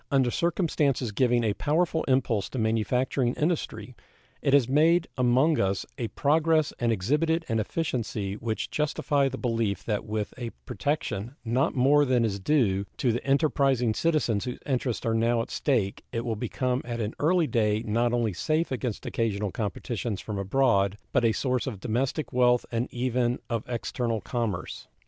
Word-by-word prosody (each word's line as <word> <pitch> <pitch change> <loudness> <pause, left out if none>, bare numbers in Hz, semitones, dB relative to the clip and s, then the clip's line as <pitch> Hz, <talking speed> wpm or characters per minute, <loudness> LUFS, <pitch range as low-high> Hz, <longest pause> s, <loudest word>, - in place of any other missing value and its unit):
Under 130 -3 +2
circumstances 150 - 0
giving 120 +2 +2
a 105 -2 +1
powerful 160 - 0
impulse 120 -6 +1
to - - -6
manufacturing 120 +3 +1
industry 160 +2 -2 0.5
it - - +1
has 140 -4 +5
made 160 +5 +3
among 130 +5 +3
us 95 -1 0
a 120 - -3
progress 155 +6 +2
and 120 -1 +1
exhibited 150 - +1
an 115 -1 0
efficiency 110 -6 -2
which 110 +1 -3
justify 145 -2 +1
the 135 - -6
belief 115 -6 -1
that 105 -3 -1
with 105 -1 -3
a 120 -2 -3 0.2
protection 130 -6 -2
not 125 +4 +1
more 140 +3 +5
than 125 -4 +2
is 100 -2 -2
due 100 -5 +2
to 125 - +2
the 120 - -2
enterprising 135 -4 +2
citizens 140 -8 +1
whose 125 - -4
interests 130 -3 -1
are 115 - +1
now 115 +1 +2
at 115 - -3
stake 110 -9 0
it 115 0 -3
will 115 -2 -1
become 125 +3 -1
at 120 -1 -5
an 110 0 -2
early 170 +2 +3
day 110 -5 +1
not 115 +3 +1
only 120 -4 0
safe 155 - 0
against 125 -4 -3
occasional 105 -3 -1
competitions 110 0 -3
from 105 -2 -5
abroad, 100 -2 +2
but 130 - +2
a 115 - +4
source 125 +2 -1
of 110 -7 -4
domestic 130 +7 -2
wealth 125 -1 +3
and 115 +1 -2
even 125 0 0
of 115 -1 -1
external 120 -1 -2
commerce. 110 -2 -4
120 Hz, 165 wpm, -27 LUFS, 110-140 Hz, 0.5 s, has